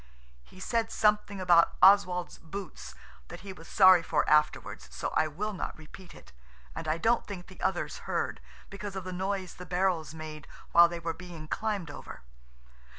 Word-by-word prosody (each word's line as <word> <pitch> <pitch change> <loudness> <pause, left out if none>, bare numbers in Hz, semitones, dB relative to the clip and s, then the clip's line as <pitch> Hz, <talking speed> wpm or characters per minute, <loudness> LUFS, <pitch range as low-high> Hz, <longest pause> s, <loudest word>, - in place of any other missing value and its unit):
He 185 - -17
said 225 +3 -1
something 210 -2 +1
about 175 -2 +4
Oswald's 185 -3 +4
boots 195 +5 -8 0.3
that - - -10
he 195 -1 -8
was 165 -2 -14
sorry 185 -3 +7
for - - 0
afterwards, 150 - +1
so 65 - -3
I 155 - +1
will 205 +8 -4
not 185 - -5
repeat 170 +3 -13
it, - - -16 0.4
and - - -6
I 155 +1 +1
don't 230 +7 +1
think 185 -3 -7
the 185 - -15
others 185 -2 -1
heard, - - -1 0.3
because 200 0 -7
of 190 - -4
the 185 0 -6
noise 190 0 -3
the 180 - -10
barrels 180 -4 0
made 155 -1 -8 0.2
while 170 0 +7
they 170 0 -5
were 165 0 -3
being 170 -3 -10
climbed 205 -5 -2
over. 105 - -10
180 Hz, 175 wpm, -29 LUFS, 165-195 Hz, 0.4 s, sorry